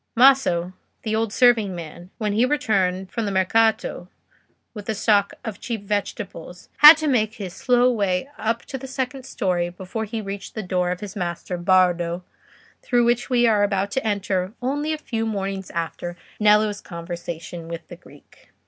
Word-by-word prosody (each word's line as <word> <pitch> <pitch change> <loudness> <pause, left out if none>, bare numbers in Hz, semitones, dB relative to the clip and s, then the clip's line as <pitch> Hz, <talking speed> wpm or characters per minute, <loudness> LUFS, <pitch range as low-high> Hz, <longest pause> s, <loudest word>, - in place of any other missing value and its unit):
Maso, 235 -9 +4 0.3
the 220 -1 -1
old 225 -1 0
serving 225 -5 +3
man, 175 +1 -9
when 210 -2 -1
he 220 +4 +3
returned 195 -9 0
from 230 -3 -2
the - - -1
Mercato 195 -1 +1 0.6
with 210 -3 -9
the 220 - -1
stock 205 -2 +2
of 220 -3 -5
cheap 230 -4 -4
vegetables, 200 -3 -5
had 300 +2 +11
to 315 -1 -2
make 220 -5 +1
his 195 -5 -6
slow 250 +3 +3
way 200 -2 0
up 230 -1 -2
to 265 - -6
the 265 - -8
second 260 0 -4
storey 175 -2 -1
before 190 +5 -5
he 220 +2 -4
reached 200 -1 -7
the 215 - -3
door 180 -1 0
of 180 0 -3
his 205 0 -7
master, 175 -1 -3
Bardo, 175 -1 +2 0.6
through 240 -1 +2
which 240 0 +1
we 245 -2 +3
are 215 -3 +3
about 200 -1 0
to 265 - -1
enter 200 -3 -1
only 290 +5 -1
a 310 - -1
few 230 -7 -3
mornings 195 -3 -3
after 170 +1 -4 0.2
Nello's 210 -1 +3
conversation 170 -1 -7
with 165 0 -7
the - - -9
Greek. - - -20
205 Hz, 175 wpm, -23 LUFS, 180-230 Hz, 0.6 s, had